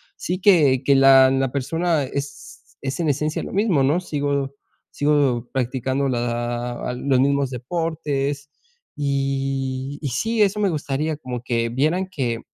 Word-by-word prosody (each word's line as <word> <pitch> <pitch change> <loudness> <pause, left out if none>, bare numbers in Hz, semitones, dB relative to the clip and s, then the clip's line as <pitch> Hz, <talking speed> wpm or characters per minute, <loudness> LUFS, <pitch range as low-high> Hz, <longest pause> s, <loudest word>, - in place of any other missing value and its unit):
sí 180 +1 -3
que 150 -10 +4
que 140 +1 +4
la 135 -1 +7
la 135 -1 0
persona 160 +4 0
es 95 -11 -8
es 135 +4 -4
en 165 -3 +1
esencia 150 +2 -1
lo - - -7
mismo, 195 -9 +2
¿no? 145 +6 +2
Sigo 140 -5 -2 0.3
sigo 140 -5 +1
practicando 130 +2 -1
la 120 -1 -2
ah, - - -3
los 130 +1 +1
mismos 140 0 +2
deportes, 145 +1 -3 0.5
y 135 -1 -2
y 145 - -2
sí, 225 - 0
eso 205 0 +2
me 200 - +3
gustaría 150 -1 -2
como 125 -5 -6
que 115 -2 0
vieran 155 +10 0
que 125 -10 -2
140 Hz, 150 wpm, -22 LUFS, 130-150 Hz, 0.5 s, la